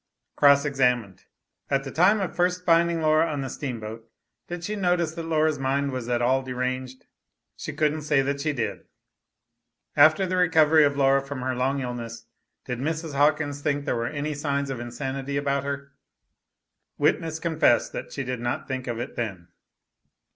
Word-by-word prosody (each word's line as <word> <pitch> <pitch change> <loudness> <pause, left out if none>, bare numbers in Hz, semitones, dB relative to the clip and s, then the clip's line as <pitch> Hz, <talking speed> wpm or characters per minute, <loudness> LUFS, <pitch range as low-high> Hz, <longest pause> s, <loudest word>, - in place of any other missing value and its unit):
Cross 140 0 +5
examined. 125 -8 0 0.4
At 135 0 +1
the 135 - -6
time 195 +7 +4
of 190 - -3
first 180 0 0
finding 170 -1 +3
Laura 155 +1 +3
on 145 -2 -2
the 135 - -4
steamboat, 115 -4 -6 0.4
did 175 0 -6
she 210 +5 -3
notice 175 -4 +1
that 165 -1 -6
Laura's 155 -2 +1
mind 135 +1 0
was 125 -2 -4
at 120 0 +1
all 130 +2 +3
deranged? 130 0 -4 0.5
She - - -6
couldn't 155 0 0
say 150 -2 +2
that 140 +1 -2
she 155 +1 0
did. 110 -7 -4 1.1
After 155 +6 +6
the 185 0 -1
recovery 160 -3 +5
of 140 -1 0
Laura 135 0 +4
from 135 -1 -6
her 130 0 -1
long 135 +2 0
illness, 115 -2 -6 0.4
did 125 -2 -4
Mrs. 160 +2 -3
Hawkins 145 0 +1
think 145 -1 -1
there - - 0
were 115 0 -1
any 150 +2 -3
signs 140 -1 -2
of 130 - -4
insanity 130 +3 -4
about 140 -1 0
her? 140 0 -5 1.1
Witness 160 -1 +1
confessed 160 -7 +2
that - - -6
she 140 - -4
did 125 -1 -4
not 120 0 -3
think 130 -1 -4
of 120 -1 -3
it 120 - -5
then. 95 -7 -4
140 Hz, 175 wpm, -25 LUFS, 130-155 Hz, 1.1 s, After